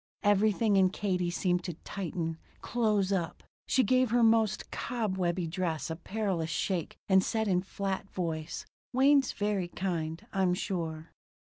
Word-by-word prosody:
Everything 205 +1 +3
in 190 -1 +5
Katie 185 -3 -1
seemed 180 0 0
to 175 - -4
tighten 165 -4 -3 0.2
close 210 -5 +1
up. 175 -3 -2 0.2
She 260 - +3
gave 255 +3 +3
her 240 +1 +3
most 225 -2 +3
cobwebby 190 -7 -1
dress 165 -1 -2
a - - -2
perilous 185 -2 -2
shake 175 0 -2
and 190 -1 +5
said 220 +1 0
in 180 -2 +2
flat 195 0 -3
voice: 160 -4 -3 0.3
"Wayne's 270 +1 +5
very 205 -3 -1
kind, 170 0 -3
I'm 190 -2 +2
sure." 165 -5 -4
190 Hz, 140 wpm, -30 LUFS, 175-210 Hz, 0.3 s, in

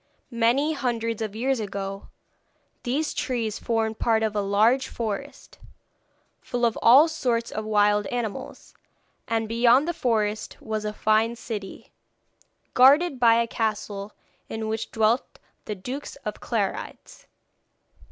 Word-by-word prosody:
Many 245 +7 +2
hundreds 230 -5 -2
of 215 -2 -4
years 260 +3 0
ago 195 -1 -5 0.7
these 285 +6 -1
trees 230 -5 -2
formed 225 -1 -1
part 225 -1 +2
of 215 -1 -1
a 205 - +1
large 215 +6 +2
forest, 215 -4 -6 0.8
full 245 -1 -1
of 230 - +1
all 270 +7 +7
sorts 245 -7 -1
of 215 - -4
wild 210 -1 +2
animals, 230 -2 -5 0.5
and 225 -1 0
beyond 240 +5 +4
the 345 - 0
forest 215 -5 -1
was 215 -1 -4
a 210 - -1
fine 220 +2 +1
city, 215 -4 -7 0.8
guarded 275 +3 +5
by 230 -2 +6
a 235 0 +2
castle 215 -3 -3 0.4
in 220 0 -4
which 220 +1 -3
dwelt 225 +3 0 0.3
the 210 - -4
Dukes 255 +9 -6
of - - -4
Clarides. - - -4
225 Hz, 130 wpm, -25 LUFS, 215-245 Hz, 0.8 s, all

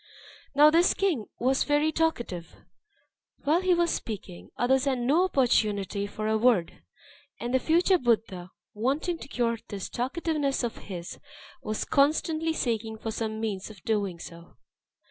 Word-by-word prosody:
Now 300 +1 +7
this 340 +3 +4
king 335 - 0
was 260 +3 +2
very 295 +1 +2
talkative; 240 - -2 0.9
while 315 +5 +3
he 370 -1 +3
was 340 -1 +2
speaking, 95 - -6
others 260 +2 +2
had 270 -2 +1
no 285 +9 +3
opportunity 210 - +1
for 215 +1 -4
a 220 0 +1
word. 220 -8 +2 0.6
And 240 +1 -3
the 260 - +4
future 345 +6 +3
Buddha, 220 -7 0 0.2
wanting 280 - -1
to - - -9
cure 235 -4 -1
this 200 -2 -5
talkativeness 280 +1 -1
of 235 - -3
his, 175 -2 -6 0.4
was 215 -5 -3
constantly 315 +3 +2
seeking 225 -7 -2
for 225 0 -4
some 220 0 -3
means 210 -3 -3
of 205 -5 -14
doing 200 -5 -1
so. 170 0 -12
240 Hz, 145 wpm, -27 LUFS, 215-305 Hz, 0.9 s, Now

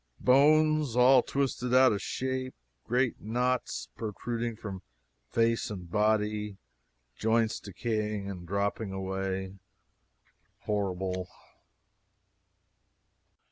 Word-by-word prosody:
Bones 150 0 +4
all 125 +1 +7
twisted 125 -2 -1
out 130 0 +7
of 100 - -1
shape, 130 0 -3 0.3
great 125 +1 +1
knots 125 - -1
protruding 115 +2 -3
from 100 -4 -7 0.5
face 115 0 +1
and 90 -5 -7
body, 105 0 +1 0.6
joints 115 0 +2
decaying 105 0 -3
and 90 -3 -7
dropping 100 +2 -1
away 95 0 -3 1.0
horrible! 95 -3 -2
110 Hz, 85 wpm, -29 LUFS, 100-125 Hz, 1.0 s, all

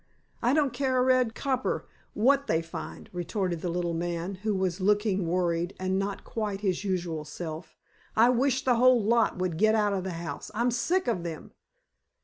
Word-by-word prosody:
"I 245 +4 +3
don't 285 -5 +2
care 260 0 0
a 250 - +4
red 255 -3 +3
copper 260 -2 -1 0.3
what 275 +5 +3
they 160 +1 +1
find," 165 -1 -8
retorted 180 -1 -2
the 180 - -2
little 170 0 -1
man, 170 +2 -2
who 215 -1 0
was 185 -1 -1
looking 205 -2 +2
worried, 175 0 0
and 185 +1 0
not 195 0 -3
quite 210 -3 -3
his 190 -2 0
usual 175 -5 -2
self. 160 +1 -7 0.4
"I 230 +3 +6
wish 260 +2 +1
the 250 -2 +3
whole 250 -2 +5
lot 230 -1 +2
would 180 -3 -1
get 215 +1 +4
out 210 -2 +2
of 190 -2 -1
the 190 -1 -4
house. 165 0 -6
I'm 240 +2 +2
sick 335 +11 0
of 225 -7 0
them." 165 -2 -7
200 Hz, 185 wpm, -28 LUFS, 175-240 Hz, 0.4 s, I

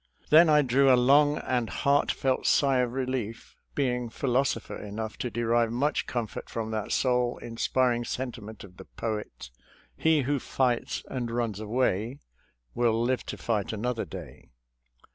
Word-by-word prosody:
Then 160 +2 +8
I 150 -1 +5
drew 135 +1 +4
a 125 - +6
long 145 +4 +4
and 125 -3 -1
heartfelt 140 -1 +1
sigh 135 -3 +3
of 125 -1 +1
relief, 125 -4 -4 0.2
being 125 -4 0
philosopher 125 -1 -1
enough 110 +2 -6
to 125 - -2
derive 115 0 +1
much 140 +6 0
com 120 -2 -1
fort 105 - -9
from 110 -1 -4
that 110 -2 -3
soul 125 -2 +1
inspiring 120 +1 0
sentiment 115 -4 -6
of 95 -2 -14
the - - -11
poet, 105 - -5 0.2
" - - -29
He 160 - +3
who 140 +2 0
fights 125 -1 -1
and 125 -3 -3
runs 115 -3 -2
away 115 +1 0 0.6
Will 115 -2 +2
live 125 +2 0
to - - -5
fight 110 -4 -1
another 115 +1 -2
day." 80 - -10
120 Hz, 155 wpm, -28 LUFS, 115-130 Hz, 0.6 s, Then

